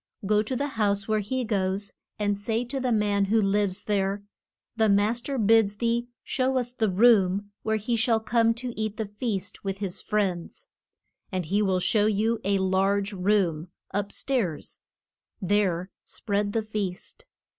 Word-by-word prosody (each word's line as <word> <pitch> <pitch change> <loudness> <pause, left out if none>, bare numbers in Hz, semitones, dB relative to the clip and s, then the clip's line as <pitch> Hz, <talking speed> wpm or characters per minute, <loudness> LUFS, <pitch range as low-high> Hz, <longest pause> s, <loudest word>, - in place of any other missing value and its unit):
Go 210 +1 +3
to 235 +5 -3
the 285 +3 -1
house 200 -1 +1
where 215 -1 +1
he 255 +5 -2
goes, 200 -2 -1 0.2
and 205 -1 0
say 225 +4 -2
to 270 +3 -4
the 255 -1 0
man 205 -2 +2
who 220 +3 +2
lives 200 -1 +1
there, 200 -1 0 0.5
The 220 -2 +3
mas 210 +4 +2
ter 275 +2 -3
bids 220 -2 +4
thee 235 +1 0 0.2
show 260 0 0
us 245 -1 -1
the 220 -4 +1
room 200 -1 +4
where 220 0 0
he 220 +3 -1
shall 225 0 +2
come 230 +1 +2
to 245 0 -5
eat 215 -1 -3
the 220 - -2
feast 205 -2 -4
with 195 -1 -3
his 195 -3 -4
friends. 190 -5 -2 0.6
And 185 -2 -2
he 200 +6 +1
will 190 -3 +2
show 210 +3 +2
you 220 +2 +1
a 200 0 +2
large 195 +2 +1
room, 180 -4 +1 0.3
up 205 0 -1
stairs; 225 - -2 0.6
there 190 -2 0
spread 205 -1 -2
the 225 - 0
feast. 215 - -5
205 Hz, 165 wpm, -26 LUFS, 195-225 Hz, 0.6 s, bids